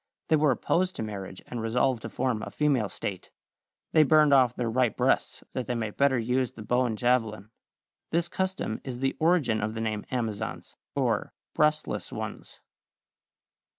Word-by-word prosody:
They 160 - +5
were 150 -1 +3
opposed 180 +8 +1
to - - -3
marriage 95 -3 -6
and 120 - -5
resolved 120 +2 +1
to - - -6
form 125 -4 -1
a - - -5
female 135 -9 +1
state. 95 -3 -5 0.6
They 155 - +6
burned 155 -1 +5
off 125 -3 +5
their 120 - -1
right 120 0 +1
breasts - - +1
that 130 - -3
they 125 - -1
might 110 -3 -3
better 140 -2 +3
use 125 +2 0
the 110 - -9
bow 125 +4 +2
and 110 -2 -3
javelin. 110 -4 0 0.6
This 170 +1 +1
custom 185 - -2
is 130 -3 -5
the 135 +1 0
origin 155 -10 +3
of 110 +2 -2
the 110 - -3
name 110 -2 -2
"Amazons" 115 -5 -3 0.2
or - - 0 0.2
"breastless 150 - +1
ones." - - -7
125 Hz, 170 wpm, -28 LUFS, 110-140 Hz, 0.6 s, They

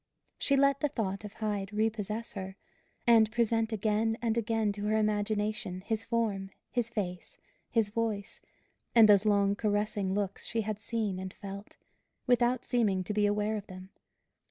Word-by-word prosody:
She 280 - +3
let 275 0 +4
the 295 - +2
thought 215 -8 -3
of 210 - -8
Hyde 205 -2 -3
repossess 215 +1 -1
her; 190 -2 -6 0.5
and 225 -3 +5
present 225 -1 +1
again 220 +1 +1
and 230 -2 0
again 225 -2 +1
to 205 0 -5
her 215 +1 +2
imagination 210 -3 -1
his 220 +3 -2
form, 215 -5 -1 0.2
his 240 -2 -1
face, 185 -6 -4 0.3
his 225 -3 +1
voice, 215 -2 -3 0.5
and 225 -2 +9
those 205 0 +5
long 200 -1 +3
caressing 205 -2 0
looks 200 -1 -2
she 225 - -1
had 215 -1 -3
seen 215 -3 -2
and 190 0 -5
felt, 200 +1 -9 0.5
without 245 0 +2
seeming 210 -7 +1
to 195 - -3
be 210 0 +3
aware 210 +1 0
of 205 - -8
them. 185 0 -10
215 Hz, 160 wpm, -30 LUFS, 200-225 Hz, 0.5 s, and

